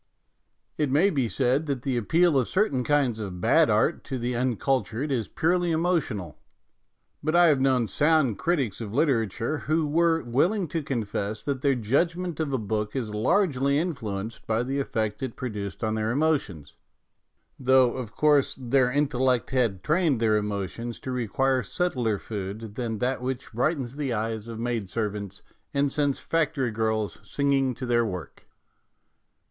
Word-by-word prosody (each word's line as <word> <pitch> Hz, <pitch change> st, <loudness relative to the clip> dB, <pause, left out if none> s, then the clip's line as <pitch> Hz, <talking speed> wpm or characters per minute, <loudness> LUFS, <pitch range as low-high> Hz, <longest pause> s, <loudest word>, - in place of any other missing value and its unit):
It 150 Hz, -2 st, +1 dB
may 160 Hz, +9 st, +3 dB
be 130 Hz, -6 st, 0 dB
said 135 Hz, +5 st, +1 dB
that 135 Hz, -3 st, -2 dB
the 135 Hz, -3 st, -1 dB
appeal 160 Hz, -, +3 dB
of 130 Hz, -3 st, +2 dB
certain 165 Hz, -11 st, +1 dB
kinds 135 Hz, -5 st, +1 dB
of 95 Hz, -4 st, -5 dB
bad -, -, +4 dB
art -, -, +2 dB
to 130 Hz, -, -3 dB
the 120 Hz, 0 st, -2 dB
uncultured 130 Hz, +2 st, 0 dB
is 120 Hz, -6 st, -1 dB
purely 175 Hz, +2 st, +1 dB
emotional; 160 Hz, -, -1 dB, 0.8 s
but 155 Hz, +3 st, 0 dB
I 175 Hz, -1 st, +7 dB
have 140 Hz, -3 st, +3 dB
known 130 Hz, -4 st, +2 dB
sound 150 Hz, -7 st, +2 dB
critics 135 Hz, -, 0 dB
of 110 Hz, -1 st, -6 dB
literature 125 Hz, -, +1 dB
who 155 Hz, +1 st, 0 dB
were 165 Hz, +1 st, +2 dB
willing 170 Hz, -, +1 dB
to 165 Hz, +1 st, -2 dB
confess 110 Hz, -6 st, -3 dB
that 140 Hz, -3 st, -2 dB
their 140 Hz, -1 st, +3 dB
judgment 165 Hz, +9 st, 0 dB
of 155 Hz, -3 st, -1 dB
a 135 Hz, -, +1 dB
book 105 Hz, -1 st, -3 dB
was 115 Hz, -5 st, -3 dB
largely 140 Hz, -, +2 dB
influenced 115 Hz, -, -4 dB
by 115 Hz, +1 st, +1 dB
the 135 Hz, +3 st, -2 dB
effect 110 Hz, -6 st, -2 dB
it 130 Hz, -3 st, -4 dB
produced 105 Hz, -7 st, -5 dB
on 110 Hz, 0 st, 0 dB
their 110 Hz, 0 st, -1 dB
emotions, 120 Hz, -, 0 dB, 0.9 s
though, 130 Hz, -1 st, +4 dB
of 125 Hz, -4 st, -5 dB
course, 150 Hz, -2 st, +3 dB
their 130 Hz, 0 st, +2 dB
intellect 130 Hz, -3 st, +1 dB
had 115 Hz, -8 st, 0 dB
trained 155 Hz, -5 st, +2 dB
their 110 Hz, -2 st, +3 dB
emo 105 Hz, -2 st, -1 dB
tions 115 Hz, +4 st, -7 dB
to 130 Hz, -, -5 dB
require 130 Hz, +2 st, +1 dB
subtler 120 Hz, -, -1 dB
food 105 Hz, +1 st, -6 dB
than 115 Hz, -1 st, -3 dB
that 125 Hz, +3 st, -1 dB
which 130 Hz, -1 st, -4 dB
brightens 135 Hz, +1 st, -1 dB
the 140 Hz, -5 st, -1 dB
eyes 110 Hz, 0 st, -3 dB
of 115 Hz, -1 st, -7 dB
maid 115 Hz, -5 st, -2 dB
servants 105 Hz, -3 st, -4 dB, 0.3 s
and 140 Hz, 0 st, +2 dB
sends 145 Hz, -2 st, +1 dB
factory 150 Hz, -6 st, 0 dB
girls 110 Hz, -1 st, -1 dB
singing 135 Hz, -3 st, 0 dB
to 130 Hz, -, -5 dB
their 120 Hz, -1 st, +2 dB
work. 90 Hz, -6 st, -6 dB
130 Hz, 165 wpm, -26 LUFS, 110-145 Hz, 0.9 s, I